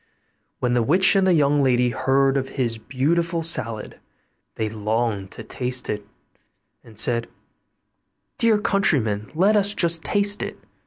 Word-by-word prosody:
When 125 -1 0
the 120 - +2
witch 180 - +4
and 190 -1 +3
the 185 - +4
young 145 -2 +2
lady 125 -2 +2
heard 135 +2 +1
of 135 -1 -2
his 120 -4 -3
beautiful 165 +7 -1
salad, 115 -9 -1 0.6
they 110 - -2
longed 110 -1 -2
to 115 - -9
taste 125 +2 -1
it, 105 -1 -6 0.8
and 110 -2 -17
said, 115 +1 +1 1.1
'Dear 230 -2 +3
countryman, 125 - +1
let 195 +6 +3
us 205 0 +2
just 165 -2 +1
taste 205 +6 0
it. - - -5
135 Hz, 145 wpm, -22 LUFS, 115-170 Hz, 1.1 s, witch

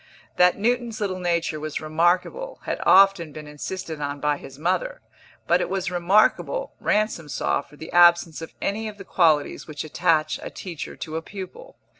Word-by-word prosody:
That 180 0 +5
Newton's 235 +1 0
little 190 -3 -2
nature 170 -3 -1
was 155 0 -4
remarkable 175 - 0
had - - -3
often 195 -4 +6
been 155 +1 -9
insisted 155 +1 -6
on 145 0 -3
by 150 0 +1
his 135 -1 -12
mother; 185 - -1 0.5
but 175 +1 +3
it - - -2
was 190 -1 -2
remarkable, 205 - +2
Ransom 210 -7 0
saw, 135 +1 0
for 140 +1 -18
the 160 +2 -9
absence 175 -2 +5
of 165 - -7
any 220 +3 -1
of 210 -1 -8
the 195 - -10
qualities 155 -6 +2
which 150 -3 -5
attach 155 -1 +1
a - - -6
teacher 170 -5 -7
to 160 0 -5
a - - -3
pupil. 200 - -9
175 Hz, 175 wpm, -24 LUFS, 155-195 Hz, 0.5 s, often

